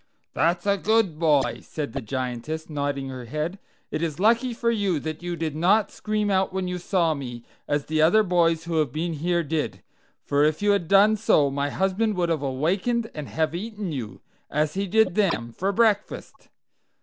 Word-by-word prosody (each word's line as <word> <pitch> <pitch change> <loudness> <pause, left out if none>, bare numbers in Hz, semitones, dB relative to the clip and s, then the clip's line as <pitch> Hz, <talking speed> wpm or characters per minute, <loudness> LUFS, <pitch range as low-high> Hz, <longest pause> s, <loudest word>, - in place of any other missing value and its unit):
"That's 170 +3 +1
a 200 0 +2
good 210 -7 +1
boy," 140 -8 +2
said 145 -7 -5
the - - -3
Giantess, 130 +7 -4
nodding 140 -2 -2
her 130 -2 -7
head; 155 - -3 0.3
"it 155 - -2
is 165 -1 -2
lucky 230 +5 +3
for 235 0 0
you 200 -8 0
that 155 +2 -5
you 175 0 -3
did 160 -3 -3
not 195 +7 +3
scream 210 -1 -1
out 190 0 +1
when 190 -1 -2
you 180 0 -3
saw 170 -2 +1
me, 120 -5 -7 0.2
as 145 -1 0
the 155 0 0
other 180 +8 +5
boys 170 -3 +2
who 165 -1 -2
have 150 -5 +1
been 165 +4 -2
here 170 +3 0
did, 145 - -3 0.4
for 145 +1 +2
if 155 0 +2
you 205 0 +3
had 200 -5 +1
done 205 +3 +5
so 145 -9 +3
my 140 +1 -1
husband 195 +5 0
would 175 -2 0
have 160 -3 0
awakened 185 - -1
and 150 -2 -6
have 160 -1 -1
eaten 205 0 -5
you, 110 -9 -6 0.3
as 150 0 0
he 195 +1 -2
did 220 -1 +3
them, 170 - 0
for 190 - -1
breakfast. 210 -1 0
165 Hz, 195 wpm, -25 LUFS, 145-200 Hz, 0.4 s, other